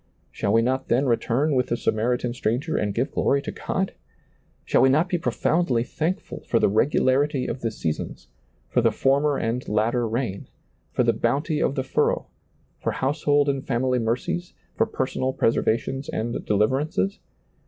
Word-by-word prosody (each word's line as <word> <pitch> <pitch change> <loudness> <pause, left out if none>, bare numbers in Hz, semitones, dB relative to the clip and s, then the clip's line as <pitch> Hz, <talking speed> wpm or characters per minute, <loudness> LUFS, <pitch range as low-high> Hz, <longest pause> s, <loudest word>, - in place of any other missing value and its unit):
Shall 100 - -1
we 115 +1 +4
not 130 +2 0
then 125 +4 +2
re 120 -3 +4
turn 140 +7 0
with 125 -2 +2
the 120 - -1
Samaritan 120 +3 0
stranger 125 +7 -1
and 100 -1 -1
give 130 +4 0
glory 140 - +2
to - - -4
God? 190 0 -2 0.7
Shall - - +3
we 130 - +6
not 155 +7 +3
be 175 - 0
profoundly 160 -7 +1
thankful 165 +8 -3
for - - +2
the - - +4
regularity 130 +4 +2
of 130 - -4
the 115 - 0
seasons, 80 - -4 0.4
for 125 - +1
the 115 -1 +3
former 140 +5 +2
and 115 +3 -2
latter 115 +3 +1
rain, 110 -3 -3 0.4
for - - +1
the - - +3
bounty 150 +2 0
of 140 - +1
the 130 - -1
furrow, 130 - +1 0.5
for - - -1
household 145 +1 +1
and 135 -1 -1
family 125 +1 +1
mercies, 120 +10 -2 0.2
for 225 - +2
personal 130 -7 -2
pres 115 - +2
ervations 135 +5 -1
and 115 +2 -3
deliverances 105 -1 +1
130 Hz, 170 wpm, -24 LUFS, 115-145 Hz, 0.7 s, we